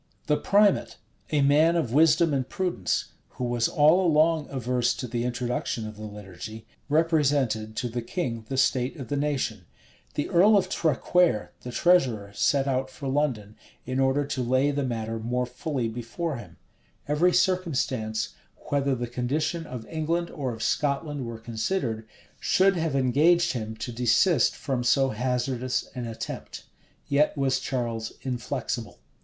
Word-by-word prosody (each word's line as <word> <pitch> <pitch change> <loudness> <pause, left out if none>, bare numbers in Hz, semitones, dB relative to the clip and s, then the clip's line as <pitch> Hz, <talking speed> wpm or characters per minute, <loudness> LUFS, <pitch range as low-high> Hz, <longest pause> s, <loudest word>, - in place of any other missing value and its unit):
The 150 - +2
primate, 205 +5 +2 0.3
a 150 -2 +2
man 155 +4 +4
of 150 -9 0
wisdom 160 +1 +4
and 130 -2 -1
prudence, 185 -2 -1 0.3
who - - -3
was 120 -1 +1
all 160 +4 +4
along 160 -2 +3
averse 125 -2 0
to 125 - -5
the 120 0 -2
introduction 120 -2 -2
of 110 - -8
the 110 +1 -7
liturgy, 105 +2 -9 0.2
represented 145 -9 +1
to 125 - -2
the 120 +1 -3
king 115 -4 -3
the 135 - -2
state 130 +1 +2
of 130 - -7
the 145 - -1
nation: 135 -9 -1 0.5
the 145 - -1
earl 200 +4 +6
of 185 -1 +1
Traquaire, 165 - +2
the 125 - -7
treasurer, 120 - +2
set 140 +6 +2
out 130 0 0
for 135 +1 -7
London, 130 -7 -1 0.3
in 130 +1 -2
order 135 +2 +2
to 135 -2 -3
lay 130 +4 +2
the 145 0 -1
matter 115 -3 -3
more 125 +3 -1
fully 125 0 -3
before 120 +7 -4
him: 120 - -11 0.5
every 150 +5 +3
circumstance, 140 - 0 0.4
whether 140 -1 +2
the 120 0 -3
condition 150 +7 -2
of 125 -3 -7
England 165 +2 -2
or 135 -5 -3
of 110 -1 -6
Scotland 145 -2 -1
were 115 -1 -6
considered, 115 0 -2 0.3
should 195 +1 +3
have 160 -4 -1
engaged 160 +7 +3
him 110 -3 -4
to 110 +3 -5
desist 125 - +3
from 130 -3 -2
so 135 +2 +3
hazardous 125 +1 -1
an 125 -2 -4
attempt: 115 -1 -7 0.4
yet 145 +2 +2
was 135 -1 +1
Charles 115 -4 -3
inflexible. 125 -3 -3
130 Hz, 155 wpm, -26 LUFS, 120-155 Hz, 0.5 s, earl